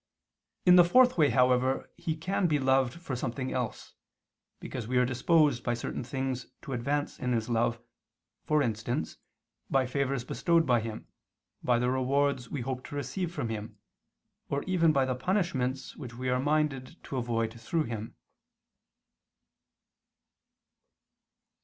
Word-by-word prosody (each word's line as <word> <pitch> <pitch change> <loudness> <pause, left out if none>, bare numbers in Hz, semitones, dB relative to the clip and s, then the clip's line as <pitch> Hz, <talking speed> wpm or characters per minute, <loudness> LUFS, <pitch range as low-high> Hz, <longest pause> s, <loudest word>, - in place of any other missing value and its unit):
In 180 0 +8
the 175 - +9
fourth 250 +8 +5
way, 150 -4 +4
however, 125 +1 +2
He 160 - -3
can 185 +3 0
be 150 -3 +2
loved 130 -2 +2
for 170 -6 -5
something 130 +2 -3
else, 125 -3 -4 0.7
because 120 -4 -6
we 125 +1 0
are 125 - +5
disposed 130 +1 +2
by 120 - 0
certain 120 - -4
things 130 0 -3 0.2
to 135 - -5
advance 140 +4 -2
in 125 -1 -1
His 115 0 -1
love, 115 0 +1 0.6
for 150 -1 +2
instance, 110 -6 -2 0.5
by 135 -1 +3
favors 135 -1 -1
bestowed 165 +5 +2
by 125 -4 +3
Him, 110 -1 -6 0.6
by 120 -1 +3
the 125 +1 +1
rewards 130 0 +1
we 140 - -3
hope 130 +1 -4
to - - -8
receive 145 +6 -3
from 140 -9 -3
Him, 110 -1 -6 0.7
or 140 0 -1
even 175 -3 +3
by 135 -3 +2
the 130 - 0
punishments 130 -4 -1
which 125 -5 -8
we 130 +1 -3
are 125 0 +2
minded 145 -2 0
to 135 - -5
avoid 115 -2 -1
through 160 +8 0
Him. 115 -4 -6
130 Hz, 145 wpm, -29 LUFS, 120-145 Hz, 0.7 s, the